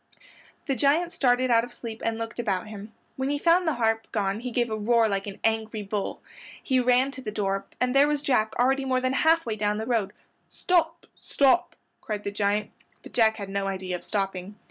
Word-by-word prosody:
The 275 - 0
giant 300 +8 +2
started 255 -5 +2
out 230 -1 +5
of 245 - -7
sleep 230 -2 -8
and 225 -1 -1
looked 230 +1 -6
about 200 -5 -1
him. 210 0 -9 0.3
When 265 +1 -1
he 290 - 0
found 335 +3 +3
the 315 - +1
harp 225 -1 0
gone 200 -1 -1
he 250 +2 -5
gave 240 -1 -1
a - - 0
roar 225 +1 +3
like 195 -1 -2
an 200 - -7
angry 220 -1 0
bull. 200 0 -4 0.4
He 260 -2 +2
ran 250 +2 +3
to 270 - -9
the 225 - -5
door 195 -1 -2
and 250 0 +1
there 275 +1 +5
was 295 -1 -1
Jack 220 -6 +1
already 270 +3 +2
more 260 -1 +1
than 255 0 0
half 325 +3 +3
way 225 -2 -2
down 210 0 0
the 220 - -3
road. 220 -4 0 0.4
"Stop! 335 -2 0
stop!" 285 +6 +1 0.3
cried 210 -4 -4
the 200 - -3
giant, 205 +1 0 0.3
but - - -13
Jack 220 -2 +4
had 200 -2 -7
no 195 0 -2
idea 185 -2 -3
of 175 - -7
stopping. 195 -1 -3
230 Hz, 215 wpm, -26 LUFS, 210-265 Hz, 0.4 s, out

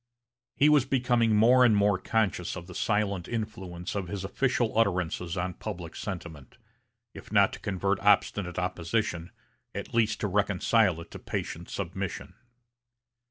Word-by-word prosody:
He 145 - +4
was 150 -3 +5
becoming 120 -4 +2
more 120 +4 +6
and 110 -4 +5
more 100 -2 +3
conscious 95 -4 -1
of 90 -2 -7
the 90 - -11
silent 100 -3 0
influence 95 -6 -5
of 100 -3 -3
his 100 +1 -5
official 120 +3 0
utterances 90 -5 0
on 90 +1 -2
public 90 -4 -7
sentiment, 85 - -7 0.6
if - - -12
not - - +4
to - - -7
convert 100 0 -1
obstinate 100 -3 +2
opposition, 90 0 -2 0.5
at - - -6
least 110 -2 +2
to 105 - 0
reconcile 100 -1 +2
it 85 - -12
to - - -8
patient 85 +1 -5
submission. 95 0 -5
100 Hz, 145 wpm, -28 LUFS, 90-110 Hz, 0.6 s, more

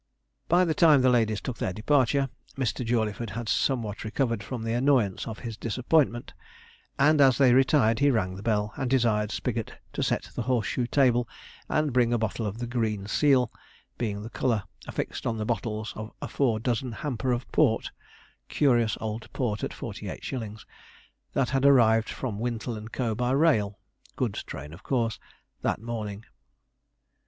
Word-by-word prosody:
By 180 +2 +4
the 160 - +1
time 155 -5 +5
the 130 - +5
ladies 110 -3 +2
took 125 - -5
their 90 - -1
departure, 135 +4 +2 0.3
Mr. 130 -1 -1
Jawleyford 115 -2 -1
had 115 +3 -5
somewhat 115 -4 0
recovered 115 0 -1
from 120 0 -5
the 115 0 -1
annoyance 120 -6 +2
of 110 -1 -5
his 115 -2 -5
disappointment; 120 +2 +1 0.6
and 150 +2 +5
as 130 -3 +6
they 130 -3 +5
retired 130 -3 +4
he 145 - +4
rang 95 -8 +1
the 95 - -8
bell, 105 -1 0
and 130 - -1
desired 115 -5 +2
Spigot - - -3 0.2
to - - -3
set - - 0
in - - -15
the - - -3
horse 125 -5 0
shoe 120 +5 -1
table, 125 -3 +3 0.4
and 155 -3 +1
bring 120 -1 +3
a 120 - +3
bottle 110 0 -2
of 100 +2 -5
the 120 - -3
"green 110 -4 -1
seal," 125 +2 +3 0.5
being 105 -3 -2
the 115 - -8
colour 115 -6 0 0.2
affixed - - -4
on 115 -2 -1
the 105 - -2
bottles 110 -1 -2
of 110 +1 -7
a - - -5
four 120 -6 +1
dozen 120 +2 -1
hamper 130 0 -2
of 120 0 -1
port - - +2 0.6
("curious 120 -6 +2
old 110 0 -5
port 110 -5 -2
at - - -1
48_s_.") 110 -4 -6 0.7
that 130 -2 +1
had 135 -1 +1
arrived 115 -5 +5
from 110 -6 -4
"Wintle 115 -2 -3
& - - -13
Co." 120 -4 -1
by 125 +3 -1
rail 130 -8 +2 0.4
(goods - - -1
train 75 +3 -8
of 85 - -12
course) 115 -3 -1 0.4
that - - 0
morning. 110 -2 -5
115 Hz, 175 wpm, -27 LUFS, 110-130 Hz, 0.7 s, as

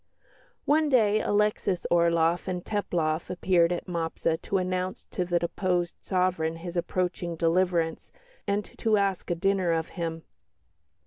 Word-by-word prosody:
One 305 +1 +3
day 215 -5 +4
Alexis 205 -3 +1
Orloff 170 0 +3
and 180 -1 -3
Teplof 170 -6 -1
appeared 180 -1 +2
at 175 - -2
Mopsa 165 -1 -2
to 195 - -1
announce 185 0 -2
to 180 - -1
the 175 0 +1
deposed 175 0 -1
sovereign 180 -4 0
his 170 +1 -7
approaching 175 -1 -1
deliverance 165 0 0 0.4
and 200 +1 0
to 220 -2 +3
ask 195 -2 0
a 175 - +1
dinner 185 0 +1
of 165 -1 -1
him. 165 -2 -4
180 Hz, 135 wpm, -27 LUFS, 170-190 Hz, 0.4 s, day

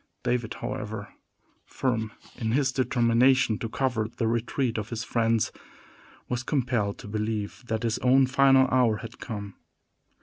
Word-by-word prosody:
David, 120 -2 -1
however, 105 -1 -5 0.5
firm 115 -4 -2 0.2
in 110 -1 -2
his 135 0 +2
determination 125 -2 +3
to 115 - -4
cover 120 -4 0
the 115 0 -2
retreat 115 +1 0
of 105 +1 -5
his 115 0 -3
friends, 115 -3 +1 0.8
was 125 0 -2
compelled 120 -7 0
to - - -10
believe 105 +1 -3
that 110 0 -2
his 115 -1 0
own 130 +1 +5
final 135 0 +5
hour 120 -4 +3
had 115 +2 -10
come. 100 -4 -6
115 Hz, 140 wpm, -27 LUFS, 110-130 Hz, 0.8 s, own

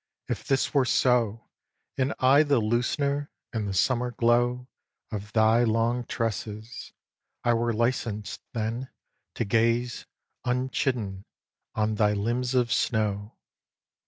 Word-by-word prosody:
if - - -3
this 135 -1 0
were 140 -2 +4
so, 120 -3 +2 0.5
And 135 +1 0
I 135 +3 +5
the 145 -4 +3
loosener, 140 +6 0 0.3
in 110 -3 -2
the 100 - -2
summer 125 +5 +2
glow, 120 +1 +1 0.4
Of 105 -1 -5
thy 110 +1 +4
long 115 +2 +1
tresses! 110 0 -4 0.5
I 120 - +3
were 120 0 +1
licensed 110 -3 -1
then 115 +3 -3 0.5
To 115 - -1
gaze, 115 +3 +1 0.4
unchidden, 125 -5 -1 0.5
on 110 0 +1
thy 105 -1 +2
limbs 120 +5 -1
of 120 -2 +2
snow. 105 -2 -1
120 Hz, 120 wpm, -27 LUFS, 110-125 Hz, 0.5 s, I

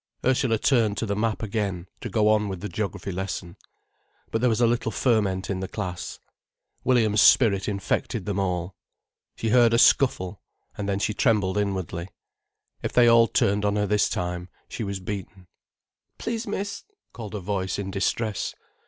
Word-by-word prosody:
Ursula 125 -3 +2
turned 110 -4 +2
to - - -1
the 100 -1 -1
map 110 +1 -1
again, 100 -5 -2
to 120 - -5
go 105 +1 +2
on 105 -1 +2
with 95 -3 -5
the 105 - -3
geography 100 -3 -4
lesson. 90 -1 -4 0.8
But 115 - 0
there 125 - +4
was 110 - +1
a 120 - +5
little 115 -1 0
ferment 100 -7 +1
in 95 -2 -2
the 95 - -3
class. 90 -1 -5 0.7
Williams' 110 -5 +3
spirit 100 -6 +5
infected 100 +2 -2
them 100 -2 -2
all. 90 -1 -2 0.6
She 115 - -2
heard 115 0 +5
a - - +4
scuffle, 105 -7 +3 0.3
and 100 -1 -4
then 100 - 0
she 105 +1 0
trembled 105 -4 +2
inwardly. 95 -3 -3 0.7
If - - -3
they 120 -1 +6
all 115 0 +6
turned 100 -1 +1
on 105 0 +1
her 105 0 +1
this 105 +1 +2
time, 90 0 -3 0.2
she 115 - -5
was 100 -2 -3
beaten. 95 -1 -7 0.7
"Please, 230 0 -3
miss——" 200 0 -4 0.3
called 110 -3 -7
a - - -3
voice 95 0 -2
in 100 -1 -4
distress. 105 +2 -1
105 Hz, 170 wpm, -25 LUFS, 95-115 Hz, 0.8 s, they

